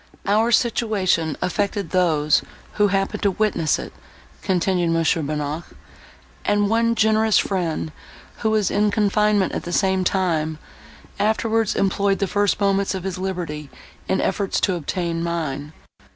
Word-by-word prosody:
"Our 215 +4 +2
situation 205 - +1
affected 200 -1 -1
those, 155 -5 +3 0.3
who 210 -1 +3
happened 195 0 -1
to 200 - +3
witness 190 -6 +1
it," - - -8 0.5
continued 180 -1 +1
Mons. 165 -1 +2
Bonnac, 150 0 -3 0.8
"and 205 0 +1
one 230 +1 +2
generous 220 -1 +3
friend, 170 -5 -1 0.5
who 220 - 0
was 215 -3 +1
in 210 +1 +2
confinement 210 -1 +2
at - - -2
the 175 - -6
same 190 0 +2
time, 165 -5 0 0.6
afterwards 220 +1 +1
employed 195 0 +1
the 195 - 0
first 205 +1 +1
moments 195 -1 +1
of 185 - -5
his 190 -1 -4
liberty 170 -6 -4 0.4
in 190 - +2
efforts 195 0 0
to 190 - +2
obtain 170 0 -2
mine. 155 -4 -3
190 Hz, 135 wpm, -22 LUFS, 170-205 Hz, 0.8 s, those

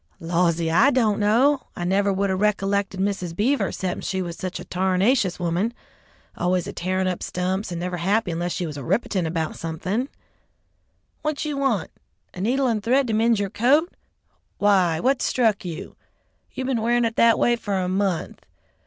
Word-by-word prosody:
"Lawsee, 170 -1 +1
I 225 +12 +5
don't 225 -6 +2
know. 250 +7 +3
I 175 - -4
never 200 +3 +2
would 195 0 0
'a' - - +1
ricollected 200 -1 0
Mrs. 190 -4 -2
Beaver 255 +9 +1
'cepten 185 -2 -3
she 190 - -2
was 175 -2 -4
such 185 +1 -5
a - - -8
tarnashious 190 +2 +1
woman, 180 +7 -1 0.6
always 180 0 0
a 200 - -6
tearin' 185 +1 -1
up 180 -1 -2
stumps, 185 +2 -2
and 170 - -4
never 180 0 -3
happy 195 +3 +1
unless 175 +2 -2
she 180 - -2
was 150 -3 -6
rippitin' 180 - -1
'bout 160 -2 -2
somethin'. 185 - -3 1.1
What 305 -1 -2
you 300 -1 -2
want? 270 -7 0 0.4
A 180 - -7
needle 260 +6 +1
and 225 -4 +1
thread 260 +5 +2
to - - 0
mend 225 +1 +3
your 200 -1 -2
coat? 285 - +2 0.6
Why, 185 -5 +3
what 260 +1 +1
struck 225 -5 +1
you? 170 -3 -7 0.6
You 260 - -4
been 255 -4 0
wearin' 240 +1 +2
it 225 0 -2
that 230 -1 +6
a - - -6
way 240 - +3
for 205 -4 -3
a 185 -1 0
month. 185 - -2
195 Hz, 180 wpm, -23 LUFS, 180-230 Hz, 1.1 s, that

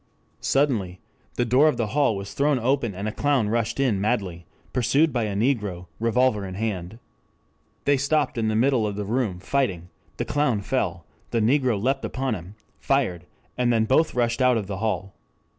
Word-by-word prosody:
Suddenly 110 -11 0 0.4
the 120 - +1
door 130 +6 +5
of 155 - +1
the 115 - 0
hall 140 -7 +3
was 100 +1 -6
thrown 140 0 +2
open 125 -3 0
and 100 +3 -4
a - - -1
clown 135 -4 +1
rushed 115 +2 -1
in 120 -8 +1
madly 95 -6 -2 0.3
pursued 140 +5 +2
by 120 -3 0
a 100 -2 -3
negro, 105 -6 0
revolver 115 -1 +2
in 95 -1 -6
hand. 100 -2 -3 0.9
They 140 0 +4
stopped 140 +1 +1
in 115 -2 0
the 110 - 0
middle 120 -1 +2
of 100 - -4
the 105 0 -3
room 110 -4 -1
fighting; 95 -6 -1 0.3
the - - -2
clown 145 -8 +1
fell, - - -2 0.2
the 115 - 0
negro 125 -1 +2
leapt 135 +5 0
upon 130 -1 -2
him, 95 +1 -8 0.2
fired, 95 -11 0 0.3
and 120 -1 +3
then 110 -1 +2
both 145 +6 +2
rushed 120 +1 +1
out 125 -2 +4
of 105 - -2
the 95 0 -5
hall. 100 -2 -2
115 Hz, 185 wpm, -24 LUFS, 100-135 Hz, 0.9 s, door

